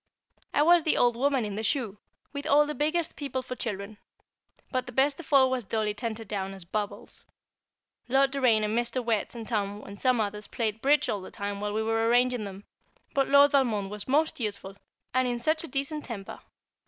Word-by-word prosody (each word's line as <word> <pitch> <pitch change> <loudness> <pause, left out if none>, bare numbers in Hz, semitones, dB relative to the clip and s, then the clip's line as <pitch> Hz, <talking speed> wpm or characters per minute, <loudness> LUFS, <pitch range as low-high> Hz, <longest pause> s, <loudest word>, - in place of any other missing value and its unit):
I 295 - +3
was 345 +2 +6
the 310 - +2
Old 240 -1 +3
Woman 265 -1 +1
in 205 - -4
the 210 - -3
Shoe, 220 -2 -1 0.3
with 285 0 -5
all 295 +1 +5
the 300 - -3
biggest 310 +3 0
people 265 -3 -4
for 255 0 -6
children; 210 -2 -5 0.7
but 255 -1 -1
the - - -6
best 275 +4 +2
of 330 - -11
all 265 -2 +6
was 255 -2 -1
Dolly 215 0 -1
Tenterdown 210 -3 -4
as 190 -3 -12
"Bubbles." 205 +3 -5 0.9
Lord 270 +1 +4
Doraine 250 -6 +3
and 210 +1 0
Mr. 240 +1 -1
Wertz 225 0 -1
and 225 -2 -7
Tom 205 -2 -2
and 200 0 -10
some 255 -2 +2
others 210 0 -2
played 225 -2 -2
"Bridge" 290 +3 +3
all 205 - -2
the 185 - -9
time 200 0 -5
while 210 0 -2
we 220 +1 0
were 225 0 +1
arranging 245 -1 +2
them; 195 0 -8 0.5
but 275 -1 +1
Lord 280 0 +7
Valmond 225 -8 +1
was 210 -1 -6
most 300 +3 +1
useful, 200 -3 -4 0.4
and 255 0 +2
in 245 -1 -1
such 310 +7 +1
a - - -5
decent 290 +1 -2
temper. 205 -5 -7
235 Hz, 205 wpm, -28 LUFS, 210-275 Hz, 0.9 s, Lord